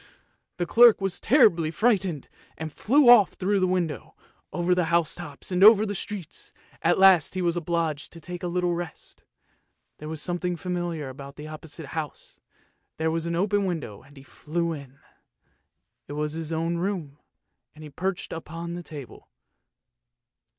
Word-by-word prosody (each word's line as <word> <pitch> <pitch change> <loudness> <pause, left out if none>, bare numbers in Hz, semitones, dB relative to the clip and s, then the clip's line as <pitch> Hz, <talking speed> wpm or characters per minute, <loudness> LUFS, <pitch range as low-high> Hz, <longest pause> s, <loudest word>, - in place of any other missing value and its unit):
" - - -46
The 175 - -1
clerk 235 +4 +6
was 195 -1 -2
terribly 210 - +4
frightened, 190 - 0 0.3
and 160 -2 -6
flew 275 +4 +3
off 235 -6 +7
through 195 +2 0
the 185 - +2
window, 175 -5 -2 0.4
over 175 +1 +1
the 180 -1 +1
house 170 -1 +1
tops 155 0 -8
and 180 +1 +2
over 215 0 +8
the 205 - -3
streets; 200 -3 -7 0.3
at - - +3
last 185 -5 +5
he 185 - -1
was 170 -1 +1
obliged 165 -3 -2
to 165 - -11
take 175 +2 -8
a 180 - -3
little 175 0 0
rest. 170 -2 -7 0.8
There 150 - -7
was 160 -1 -5
something 175 +2 -2
familiar 175 -4 -3
about 140 +1 -10
the 150 +1 -9
opposite 155 0 -9
house; 155 -3 -6 0.6
there 160 0 0
was 165 0 -2
an 170 - -1
open 200 +3 +1
window, 160 - -4
and 140 +2 -19
he 135 - -12
flew 170 +4 -3
in. 140 -3 -10 1.1
it - - -7
was 150 0 -2
his 160 0 -5
own 165 +1 -1
room, 170 -6 -3 0.6
and 155 - -12
he 150 - -10
perched 185 +5 -3
upon 165 +1 -6
the 175 - -5
table. 150 -6 -11
170 Hz, 170 wpm, -26 LUFS, 155-185 Hz, 1.1 s, over